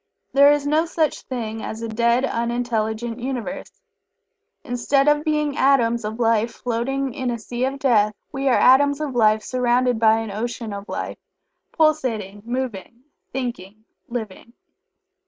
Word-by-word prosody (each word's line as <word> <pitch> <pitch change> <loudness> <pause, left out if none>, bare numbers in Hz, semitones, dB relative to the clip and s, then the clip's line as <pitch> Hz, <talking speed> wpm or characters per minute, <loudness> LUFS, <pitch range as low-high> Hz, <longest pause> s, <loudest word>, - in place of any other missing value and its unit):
There 280 +1 +7
is 290 -1 +1
no 310 +3 +2
such 320 -2 0
thing 225 -3 -5
as 220 +1 -6
a - - -2
dead, 235 +3 +2
unintelligent 235 -1 -2
Universe. 265 +2 -5 0.8
_Instead 275 +3 +1
of 295 0 +3
being 300 -2 0
atoms 235 -5 +3
of 215 +2 -5
Life 225 -1 +2
floating 255 +3 -2
in 255 0 -3
a 235 - -2
sea 240 +3 -3
of 270 +1 -3
death, 215 -6 +2 0.2
we 275 0 -2
are 255 - +4
atoms 285 +2 +5
of 300 -3 -3
Life 215 -2 +3
surrounded 250 -1 +1
by 220 -1 +5
an 225 -2 -5
ocean 225 +1 -4
of 200 0 -8
Life, - - -5 0.5
pulsating, 245 - 0
moving, 240 -1 -5 0.3
thinking, 220 -5 -5 0.2
living. 235 -1 -6
240 Hz, 145 wpm, -22 LUFS, 225-270 Hz, 0.8 s, There